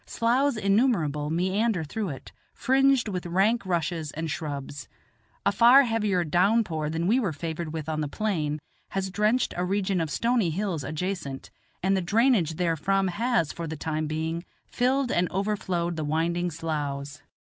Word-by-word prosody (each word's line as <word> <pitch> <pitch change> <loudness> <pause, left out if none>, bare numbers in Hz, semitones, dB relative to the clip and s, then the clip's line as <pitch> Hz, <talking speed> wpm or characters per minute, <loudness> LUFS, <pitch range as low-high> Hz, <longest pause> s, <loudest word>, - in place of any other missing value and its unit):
Sloughs 245 +3 +1
innumerable 195 - +1
meander 185 +3 +1
through 200 +6 -3
it, 135 - -8 0.2
fringed 270 -2 +3
with 180 -4 -3
rank 195 +7 +2
rushes 165 -3 -1
and 160 0 -3
shrubs. 145 -2 -5 0.6
A - - +4
far 245 +4 +7
heavier 210 -7 +1
down 185 +8 +3
pour 155 -6 -3
than 165 +2 -2
we 225 +8 +3
were 205 -9 0
favored 160 +1 -4
with 160 -1 -5
on 155 -1 -1
the 150 - -1
plain 155 -4 -1 0.3
has 190 -1 -2
drenched 215 +5 +1
a 180 - -1
region 190 -1 0
of 160 - -2
stony 230 - +1
hills 175 -3 -2
adjacent, 155 -1 -4 0.3
and 195 +1 +3
the 190 - +1
drainage 205 - +2
therefrom 180 +3 +1
has, 220 - 0
for 170 -1 -5
the 160 0 -5
time 155 +1 -2
being, 160 +2 -3 0.2
filled 255 +1 0
and 175 0 +1
overflowed 185 -4 -1
the 155 - -2
winding 170 +4 0
sloughs. 145 -3 -4
175 Hz, 160 wpm, -26 LUFS, 155-210 Hz, 0.6 s, far